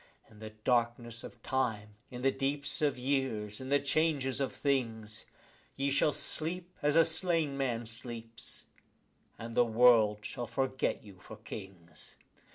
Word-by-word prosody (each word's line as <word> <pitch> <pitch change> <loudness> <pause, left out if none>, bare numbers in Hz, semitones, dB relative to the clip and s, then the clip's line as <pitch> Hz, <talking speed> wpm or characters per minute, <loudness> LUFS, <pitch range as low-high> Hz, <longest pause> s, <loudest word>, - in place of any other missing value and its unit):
In 105 - -16
the 110 0 -7
darkness 120 +1 -1
of 120 -2 -11
time, 110 -6 -1 0.2
in 125 -1 -7
the 135 - +4
deeps 140 +2 -2
of 145 -2 +2
the 125 - -10
years, 130 -6 -1
in 130 - -6
the 145 - +5
changes 140 -2 +1
of 135 - 0
things, 115 -6 -1 0.5
Ye 140 +1 0
shall 145 +2 +3
sleep 175 +5 -1
as 150 0 +2
a 165 -1 +7
slain 165 -3 +2
man 120 -4 -1
sleeps, 115 0 -6 0.7
and 115 0 -7
the - - +6
world 110 -3 +5
shall 120 -2 -4
forget 130 +1 -1
you 100 -3 -14
for 110 +1 -11
kings. 95 -6 -10
125 Hz, 155 wpm, -32 LUFS, 110-140 Hz, 0.7 s, a